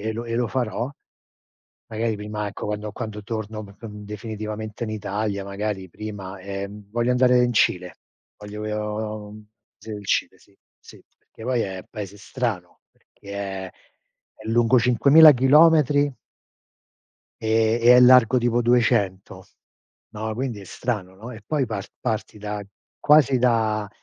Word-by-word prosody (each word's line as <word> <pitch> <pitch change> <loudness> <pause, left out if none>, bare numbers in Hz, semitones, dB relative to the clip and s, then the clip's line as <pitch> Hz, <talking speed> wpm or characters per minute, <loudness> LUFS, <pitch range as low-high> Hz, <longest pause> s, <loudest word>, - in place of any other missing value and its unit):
e - - -1
e - - -1
lo 115 - -5
e 115 -1 -4
lo 120 +1 +1
farò, 120 0 -2 1.0
magari 110 0 -2
prima, 105 0 -5
ecco, 100 0 -6
quando 105 0 -4
quando 105 -2 -6
torno 110 0 -5
p 100 -1 -13
c 105 - -29
uhm, 105 -1 -9
definitivamente 110 +1 -6
in 110 - -4
Italia, 105 -1 -3
magari 100 -1 -4
prima, 100 -1 -7
ehm, 100 +1 -7
voglio 120 +2 0
andare 125 0 +4
in 120 - +1
Cile, 90 -5 +1 0.4
voglio 105 +1 -8
io 105 0 -3
uhm, 105 0 -13 0.3
s 105 - -17
il 105 -2 -7
Cile - - 0
sì, 100 - -26 0.2
sì, - - -16
perché - - -19
poi 125 0 0
è 95 -2 -5
paese 105 -2 -7
strano, 105 -5 -4
perché - - -38
è 95 -2 -5 0.6
è 110 - -12
lungo 120 +2 +4
5000 140 +6 +7
chilometri 145 +1 +4 1.3
e 110 +1 +2
e 120 +1 +7
è - - +7
largo 125 -1 +7
tipo 120 0 +1
200. 100 -6 +1 0.6
No, 110 +1 -4
quindi 120 -3 -4
è - - -11
strano, 100 -2 -4
no? 110 +6 -10
E 110 -3 -11
poi 145 -2 0
par 105 -4 -5
parti 110 -1 -3
da 105 0 -5 0.3
quasi 145 -3 +4
da 110 -4 +1
110 Hz, 155 wpm, -23 LUFS, 105-120 Hz, 1.3 s, 5000